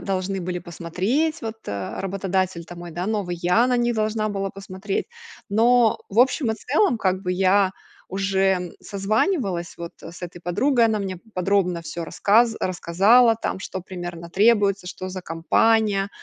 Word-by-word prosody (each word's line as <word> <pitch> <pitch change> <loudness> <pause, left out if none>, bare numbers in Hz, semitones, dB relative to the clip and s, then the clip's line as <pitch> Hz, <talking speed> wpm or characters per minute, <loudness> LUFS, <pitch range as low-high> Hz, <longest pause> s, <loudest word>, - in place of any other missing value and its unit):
должны 190 0 -2
были 180 0 -3
посмотреть. 185 - -2
Вот, 225 0 -4
э, 100 -2 -4
работодатель, 190 -2 -2
там, 175 +1 -11
мой, 175 - -8
да, 175 +3 -4
новый. 200 -5 -2
Я 180 +8 +3
на 250 -1 +2
них 240 0 +1
должна 215 0 0
была 195 -1 -3
посмотреть. 195 +1 -4 0.4
Но 230 +2 +4
в 205 - -3
общем 255 -1 +2
и - - 0
целом, 270 - +1
как 190 -1 0
бы 180 -1 -1
я 190 +1 +3 0.4
уже, 195 0 -1 0.2
м, 180 -1 -6
созванивалась 200 - -1
вот, 170 0 -6
э, 165 - -9
с - - -12
этой 175 0 -7
подругой. 230 +9 +2
Она 220 -2 +2
мне 190 -2 -4
п 175 - -18
подробно 180 -2 +1
всё 165 +1 -6
рассказ 225 +7 +3
рассказала, 200 +7 +4
там, 220 - -3
что 190 0 -6
примерно 175 -2 -7
требуется, 200 -1 +3
что 185 +1 -6
за 185 0 -6
компания. 200 +5 +2
195 Hz, 170 wpm, -23 LUFS, 180-220 Hz, 0.4 s, Но